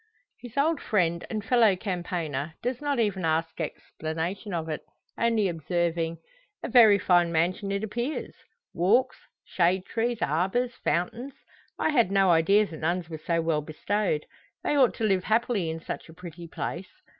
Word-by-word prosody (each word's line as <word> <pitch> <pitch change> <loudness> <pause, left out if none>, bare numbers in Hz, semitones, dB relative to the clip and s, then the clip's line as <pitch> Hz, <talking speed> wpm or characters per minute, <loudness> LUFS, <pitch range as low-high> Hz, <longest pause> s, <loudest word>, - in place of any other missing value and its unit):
His 245 +1 -11
old 305 +2 +2
friend 170 -5 0
and 215 -2 -4
fellow 225 -5 +4
campaigner 170 -6 -3
does 250 +1 -2
not 290 -2 0
even 200 -5 0
ask 160 0 0
explanation 165 +6 -4
of 165 -3 -2
it, 155 -1 -3 0.3
only 230 -3 +2
observing 170 0 -1 0.5
"A - - -3
very 225 -5 +7
fine 175 -3 +3
mansion 180 +5 0
it 200 +1 -1
appears 240 +7 -3 0.4
walks, 215 +9 +2 0.3
shade 180 +1 +1
trees, 235 +1 -1
arbours, 190 - 0
fountains. 230 - -2 0.4
I - - +1
had 240 -10 +3
no 195 -2 +4
idea 195 +6 +4
the 165 -5 -9
nuns 170 +2 -2
were 160 - -5
so 170 -1 +1
well 160 -2 +1
bestowed. 155 +2 -1 0.4
They - - +1
ought 265 -4 +4
to - - -4
live 195 -3 +2
happily 220 -5 +1
in 160 0 -4
such 165 - -7
a 160 - -13
pretty 175 -1 -9
place. 170 +2 -5
185 Hz, 160 wpm, -27 LUFS, 165-225 Hz, 0.5 s, very